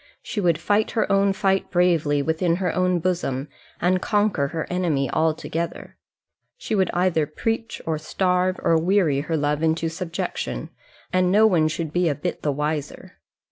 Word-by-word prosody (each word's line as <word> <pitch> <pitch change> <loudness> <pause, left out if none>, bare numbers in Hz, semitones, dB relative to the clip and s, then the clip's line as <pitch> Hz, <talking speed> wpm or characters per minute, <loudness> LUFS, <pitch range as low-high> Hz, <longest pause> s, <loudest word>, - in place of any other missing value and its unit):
She 210 - -3
would 170 -4 +2
fight 205 +6 +1
her - - +3
own 195 0 +3
fight 195 0 0
bravely 165 -5 +2
within 165 +3 +1
her 180 -1 -1
own 180 0 +2
bosom, 165 -6 -2 0.3
and 180 +1 +2
conquer 205 -9 +1
her 160 +2 -4
enemy 160 -8 0
altogether. 160 +1 -2 0.6
She - - -5
would 190 -4 +2
either 175 -4 +1
preach, 225 +8 -3
or 160 -2 -1
starve, 180 +2 0
or 165 -1 +3
weary 175 -6 +2
her 160 +3 -2
love 145 0 0
into 165 0 +1
subjection, 165 - -4 0.4
and 185 0 +3
no 215 +3 +5
one 170 -7 +4
should 155 0 -4
be 175 -1 +2
a 145 - -1
bit 145 - -4
the 150 - 0
wiser. 150 +1 -4
170 Hz, 165 wpm, -23 LUFS, 155-185 Hz, 0.6 s, no